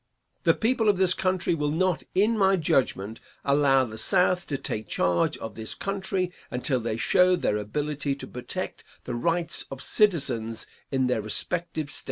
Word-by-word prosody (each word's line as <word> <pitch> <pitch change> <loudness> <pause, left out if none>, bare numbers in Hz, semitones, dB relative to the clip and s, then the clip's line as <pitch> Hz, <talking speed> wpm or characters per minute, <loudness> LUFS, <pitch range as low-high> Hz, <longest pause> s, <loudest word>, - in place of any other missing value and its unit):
The - - +5
people 225 -1 +2
of 200 - +3
this 185 -1 +5
country 185 -2 0
will 150 -2 0
not, 175 +3 +1
in 210 +5 +3
my 195 -2 +4
judgment, 125 - 0 0.3
allow 140 -1 +4
the 110 -3 -6
South 180 +7 +2
to 140 - -2
take 110 -4 -4
charge 90 - +1
of 110 - -7
this 110 0 -6
country 190 -2 -2 0.2
until 125 +1 0
they 115 -1 -3
show 180 +9 +4
their 105 -11 0
ability 145 +6 -2
to 140 - -8
protect 125 - -6 0.2
the - - -5
rights 165 +7 -1
of 135 - -7
citizens 130 - +1 0.2
in 130 -1 +1
their 125 -3 +1
respective 155 +7 -2
States. - - +1
150 Hz, 170 wpm, -26 LUFS, 120-185 Hz, 0.3 s, The